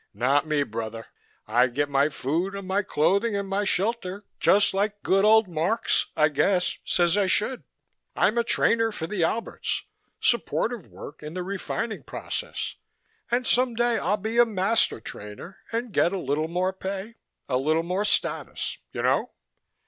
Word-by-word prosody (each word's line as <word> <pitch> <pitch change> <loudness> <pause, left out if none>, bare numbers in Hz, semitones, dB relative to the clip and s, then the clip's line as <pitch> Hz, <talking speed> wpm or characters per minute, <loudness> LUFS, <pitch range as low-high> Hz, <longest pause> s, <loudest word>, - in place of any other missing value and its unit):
"Not 140 +5 +2
me, 150 -2 +2
brother. 115 -2 -5 0.4
I 120 +4 +3
get 145 +4 -1
my 140 +1 +2
food 165 +7 -2
and 200 -1 -6
my 195 +2 +1
clothing 200 +4 +1
and 200 0 -2
my 200 +1 -1
shelter, 200 0 -1
just 200 0 +4
like 205 +1 -1
good 195 +1 +3
old 220 0 +6
Marx, 175 +7 0
I 155 -1 +4
guess, 180 +5 +1
says 175 0 +2
I 200 -2 +3
should. 225 +7 +1 0.5
I'm 215 - +3
a - - +2
trainer 230 0 +2
for 175 -6 -5
the 190 -1 -1
Alberts, 225 +7 -2 0.4
supportive 235 -3 +1
work 145 - -11
in 150 +2 -8
the 180 - -2
refining 200 +4 -3
process, - - -5 0.5
and 245 +1 +1
some 245 0 +3
day 240 -1 +2
I'll 205 - +1
be 220 +4 -1
a 240 - +8
master 210 - +1
trainer 105 - -9
and 230 -1 -3
get 175 - +3
a - - -1
little 155 -1 -1
more 180 +3 -1
pay, 195 +4 -6 0.3
a 125 - +1
little 155 +5 +1
more 180 +4 -1
status, 210 - 0
you - - -4
know?" - - +2
190 Hz, 165 wpm, -26 LUFS, 155-215 Hz, 0.5 s, a